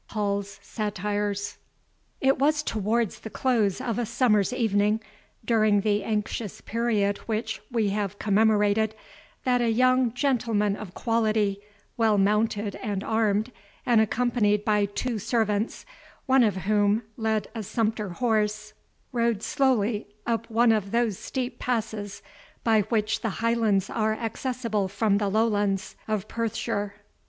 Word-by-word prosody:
HALL'S 200 -2 -2
SATIRES 205 -1 -3 0.6
It 270 0 +3
was 295 +2 +2
towards 220 -2 -1
the 220 - -8
close 225 -6 +1
of 245 -3 -2
a 240 - 0
summer's 235 -4 +2
evening, 215 -3 +1 0.5
during 215 -3 +3
the 205 -1 +1
anxious 210 0 -3
period 215 -3 0
which 220 0 -2
we 225 -4 +1
have 200 0 -2
commemorated, 215 +1 +2 0.5
that 250 -1 +2
a 235 - +2
young 255 +1 +3
gentleman 230 -7 +1
of 205 -4 -9
quality, 215 -4 +1 0.4
well 220 -3 +3
mounted 210 +1 +1
and 205 -5 -3
armed, 220 +1 +1 0.3
and 235 -3 +5
accompanied 220 -2 +1
by 210 -1 +3
two 220 +3 -3
servants, 215 0 -1 0.4
one 265 0 +4
of 210 -5 +3
whom 205 +3 +2
led 220 -2 -1
a 225 - -4
sumpter 215 0 -1
horse, 215 +1 -1 0.4
rode 235 -4 0
slowly 240 -8 +1 0.2
up 230 0 -1
one 230 +1 +4
of 210 -3 0
those 230 -3 0
steep 250 -2 -4
passes, 220 -4 -3 0.4
by 220 -2 +4
which 215 -2 0
the 225 - -1
Highlands 225 -4 +1
are 220 -1 0
accessible 230 -2 -2
from 200 +1 +1
the 205 -2 0
Lowlands 205 -2 0
of 215 -2 -2
Perthshire. 205 -3 -2
215 Hz, 130 wpm, -26 LUFS, 205-230 Hz, 0.6 s, and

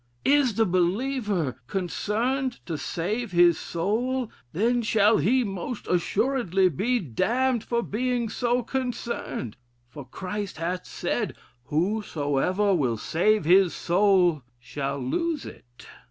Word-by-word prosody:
Is 275 -5 +3
the 225 - +3
believer 185 - 0
concerned 230 - -2
to 165 - -3
save 200 +9 -3
his 175 -1 +5
soul, 230 +8 -1 0.2
then 235 +7 +1
shall 215 -1 +3
he 255 +4 +3
most 200 +3 -5
assuredly 190 0 +1
be 225 - 0
damned 235 - 0
for 235 0 -1
being 245 +2 -1
so 245 +2 0
concerned: 240 - -4 0.3
for 130 +4 -9
Christ 190 - -5
hath 175 +3 -3
said, - - -2 0.3
'Whosoever 180 +1 0
will 130 -10 +1
save 180 - +1
his 185 +1 +5
soul 180 -3 +3 0.2
shall 135 +3 -4
lose 300 - -2
it.' 120 0 -13
200 Hz, 115 wpm, -26 LUFS, 170-240 Hz, 0.3 s, his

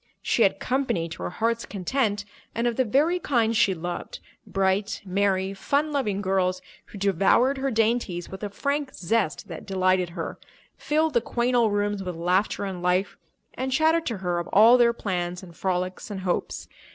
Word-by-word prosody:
She - - +1
had - - +3
"company" 255 -11 0
to 165 - -8
her - - -2
heart's 230 +5 -1
content 205 +1 -1 0.3
and 230 - 0
of 240 -1 +1
the 260 - +2
very 295 +10 +2
kind 230 -8 +1
she 195 -3 +3
loved—bright, 190 +3 -3
merry, 190 0 0
fun 285 +9 0
loving 210 -9 -1
girls 185 -1 +1 0.3
who - - -11
devoured 200 +8 +3
her 270 +1 0
dainties 220 -6 0
with 190 - -9
a 205 - -3
frank 280 +6 -2
zest 185 -1 -1
that 165 +2 -8
delighted 185 -2 +2
her, - - -5 0.4
filled 310 +1 0
the 235 - +3
quaint 240 +2 0
old 230 -4 +3
rooms 205 -1 0
with 180 -2 -5
laughter 180 +5 0
and 190 -2 -5
life, 180 +2 +1 0.4
and 260 +1 -3
chattered 320 +4 +2
to 230 - -2
her 175 -1 0
of 170 - -5
all 225 +4 +7
their 240 -1 +5
plans 180 -5 -3
and 170 -3 -12
frolics 185 +1 -2
and 200 -2 -5
hopes. 180 -2 -2
205 Hz, 175 wpm, -25 LUFS, 185-240 Hz, 0.4 s, all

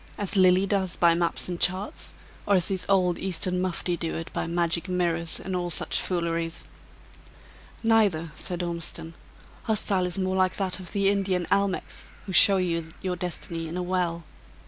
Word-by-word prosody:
As 205 -1 -1
Lilly 185 0 +5
does 195 -3 0
by 170 -1 +4
maps 170 0 0
and 175 -1 -4
charts; 185 +3 0 0.3
or 200 - +4
as 180 -3 +3
these 190 -2 -2
old 180 -3 +3
Eastern 180 0 -1
mufti 180 -1 -1
do 165 -1 -3
it 165 - -6
by - - -2
magic 170 +1 0
mirrors 170 -2 +1
and 190 -1 -4
all 175 -1 -1
each 175 - 0
fooleries?" 170 -2 -1 1.2
"Neither," 205 -8 +2
said 175 +2 -4
Ormiston, 170 -1 -5 0.5
"her 220 - +2
style 190 -3 +1
in 180 +2 -2
more 185 0 -1
like 185 -1 +2
that 190 -2 -2
of 185 0 -8
the 200 -1 +2
Indian 190 -3 0
almechs, 200 -1 -1
who 190 - -6
show 195 +2 +7
you 170 -3 -1
your 185 -1 -1
destiny 170 -1 -4
in 165 +3 -5
a 180 - -2
well. 175 -2 -1
180 Hz, 175 wpm, -26 LUFS, 170-190 Hz, 1.2 s, show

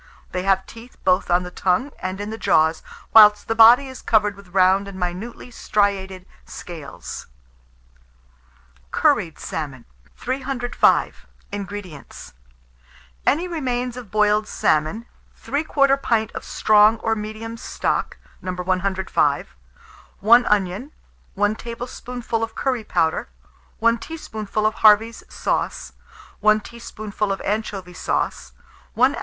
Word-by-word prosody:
They 180 - -2
have 190 0 +1
teeth 230 +2 -13
both 185 0 +2
on 175 +1 +3
the 180 - -8
tongue 190 +11 0
and 185 +1 -4
in 205 +1 -5
the 220 - -5
jaws, 160 +1 +2 0.3
whilst 210 -1 +7
the 225 - +1
body 230 +4 +7
is 260 -1 -10
covered 210 -2 +2
with 200 -1 -15
round 190 +2 +3
and 195 -1 -9
minutely 185 +8 -5
striated 195 -4 -1 0.2
scales. 160 -5 -9 1.6
CURRIED 160 - +1
SALMON. 140 -6 -6 0.3
305. 260 -1 0 0.2
INGREDIENTS. 200 -6 -8 0.9
Any 330 +6 +2
remains 250 -7 -2
of 245 -5 -9
boiled 210 +1 +2
salmon, 155 +9 0 0.3
3/4 275 -2 +1
pint 220 -4 0
of - - -7
strong 215 +1 +4
or 225 - +1
medium 215 +2 -6
stock 230 - -2 0.2
(No. 185 - -4
105), 185 +1 0 0.6
1 235 +4 +6
onion, 205 +6 0 0.4
1 205 +1 +2
tablespoonful 240 0 -5
of 225 0 -5
curry 255 -4 -1
powder, 160 - 0 0.5
1 230 +1 +2
teaspoonful 215 -9 -4
of 215 - +2
Harvey's 220 +2 +5
sauce, - - -2 0.5
1 215 0 +4
teaspoonful 215 -3 -5
of 195 - -2
anchovy 200 -3 -3
sauce, 185 - -2 0.4
1 - - +4
oz. - - -5
210 Hz, 120 wpm, -22 LUFS, 190-235 Hz, 1.6 s, whilst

